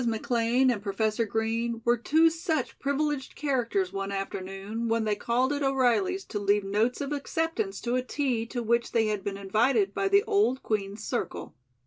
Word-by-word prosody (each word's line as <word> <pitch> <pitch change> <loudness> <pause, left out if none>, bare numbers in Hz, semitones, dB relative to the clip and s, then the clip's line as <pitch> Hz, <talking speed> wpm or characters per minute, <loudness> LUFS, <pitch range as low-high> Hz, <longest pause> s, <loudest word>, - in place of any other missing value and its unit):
McLean 235 +3 +2
and 220 -5 -2
Professor 215 +2 0
Green 225 +2 -1
were 240 0 +4
two 315 +7 +3
such 325 -1 -2
privileged 280 -1 -1
characters 235 -10 0
one 195 0 -3
afternoon 195 +3 -4
when 225 0 +1
they 215 -1 +1
called 250 +6 +1
at 290 - -2
O'Reilly's 270 +8 +1
to 205 - -4
leave 205 0 +2
notes 215 +7 0
of 280 0 -3
acceptance 325 +7 -2
to 240 - -2
a 255 - +2
tea 255 -3 -1
to 240 0 -4
which 235 +1 +1
they 225 -1 +3
had 210 -2 -2
been 200 -1 -3
invited 205 +1 +2
by 390 - 0
the 400 +1 +4
old 400 - +1
Queen's 205 0 -2
circle. 245 - -4
235 Hz, 175 wpm, -28 LUFS, 210-275 Hz, -, were